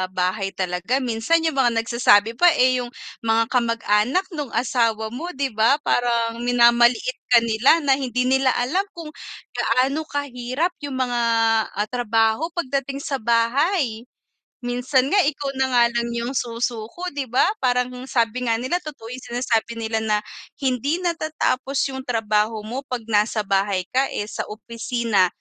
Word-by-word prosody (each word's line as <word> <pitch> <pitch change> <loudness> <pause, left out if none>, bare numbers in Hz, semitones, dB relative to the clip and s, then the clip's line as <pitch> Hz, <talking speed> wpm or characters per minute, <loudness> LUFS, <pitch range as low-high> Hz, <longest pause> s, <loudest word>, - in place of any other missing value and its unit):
bahay 185 +2 0
talaga, 185 +8 -1
minsan 245 +8 +1
yung 310 -4 0
mga 240 -3 +3
nagsasabi 230 -1 +3
pa, 355 - +6
eh, 255 0 +3
yung 245 - -4 0.3
mga 225 0 +1
kamag-anak 230 - +1
nung 295 -4 -4
asawa 230 -2 0
mo, 285 +9 -5
'di, 270 0 -1
ba, 220 +5 +3
parang, 235 -1 0
minamaliit 240 - +3
ka 235 -2 +5
nila 235 +9 +3
na, 275 -1 +3
hindi 250 -2 -1
nila 265 0 +2
alam 350 +12 0
kung 330 -3 -8 0.4
gaano 275 +5 0
kahirap 285 +3 -2 0.2
yung 270 - -5
mga, 245 -1 -2 0.6
ah, 205 +1 -1
trabaho 225 +3 +1
pagdating 275 -3 -3
sa 275 -2 -2
bahay. 235 - +1 0.6
Minsan 255 +3 0
nga, 405 - +4
ikaw 285 -2 -2
na 265 - +3
nga 245 -2 +4
lang 235 0 -1
yung 235 +2 -2
susuko, 240 +6 -3
'di 280 -2 -4
ba, 250 +2 +3 0.2
parang 250 -1 +1 0.2
sabi 240 0 0
nga 230 - +2
nila, 255 +10 -1
totoo 290 -9 -9
yung 255 - -6 0.2
sinasabi 235 -2 0
nila 225 -1 -2
na, 215 -1 0 0.4
"Hindi 275 +7 0
natatapos 310 -5 -1 0.2
yung 265 0 -7
trabaho 215 -2 0
mo 235 +5 -4
'pag 250 -2 -4
nasa 210 +1 +2
bahay 195 -1 0
ka." 265 +2 +2
Eh, - - -1
sa - - -4
opisina 230 -2 0
245 Hz, 155 wpm, -22 LUFS, 225-270 Hz, 0.6 s, pa